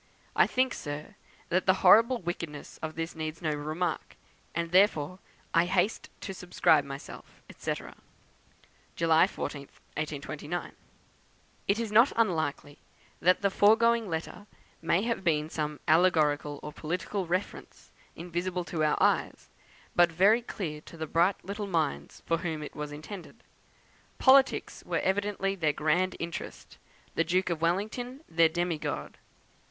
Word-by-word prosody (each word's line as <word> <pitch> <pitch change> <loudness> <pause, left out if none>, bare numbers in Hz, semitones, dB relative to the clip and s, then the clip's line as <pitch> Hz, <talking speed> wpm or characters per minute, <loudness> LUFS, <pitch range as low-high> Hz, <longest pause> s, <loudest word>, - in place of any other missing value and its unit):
I - - +5
think, 255 0 +1
sir, 150 +6 -6 0.4
that 185 +2 +1
the 185 - +6
horrible 230 +7 +7
wickedness 170 -6 -6
of 160 0 -5
this 165 +1 -4
needs 160 0 -4
no 160 -3 -1
remark, 155 +3 -3 0.4
and 170 0 -2
therefore 185 -2 +3 0.3
I 165 +1 +4
haste 190 +3 0
to 195 - -5
subscribe 175 -4 +2
myself, 140 0 -10 0.2
&c. - - -3 1.2
"July 165 +1 +4
14, 150 -7 -5
1829." 155 +3 -6 1.0
It 200 - +2
is 230 -2 -3
not 230 +6 +6
unlikely 155 -9 -1 0.4
that 180 +3 +3
the 200 - +3
foregoing 225 +2 +4
letter 165 +5 -5 0.3
may 170 +4 +2
have 230 -4 -2
had 155 -2 +1
some 150 -1 -3
allegorical 155 -3 +3
or 150 - -7
political 180 +4 -3
reference, 180 +4 -4 0.2
invisible 175 +1 -3
to 165 -2 -2
our 150 - +2
eyes, - - +1 0.5
but 175 -1 +5
very 200 +8 +4
clear 160 -10 -5
to 165 - -13
the 160 - -3
bright 170 +5 +1
little 205 +2 -4
minds 155 - -2
for 165 - +1
whom 160 -3 -3
it 145 - -9
was 150 0 -5
intended. 165 +5 -9 0.7
Politics 265 0 +4
were - - -2
evidently 195 0 0
their 160 -6 0
grand 165 +6 +1
interest; 170 -1 -7 0.3
the 165 - +2
Duke 180 +2 +1
of 160 -2 -3
Wellington 220 - -2
their 165 0 +4
demi 175 -1 -1
god. - - -5
170 Hz, 140 wpm, -29 LUFS, 155-195 Hz, 1.2 s, horrible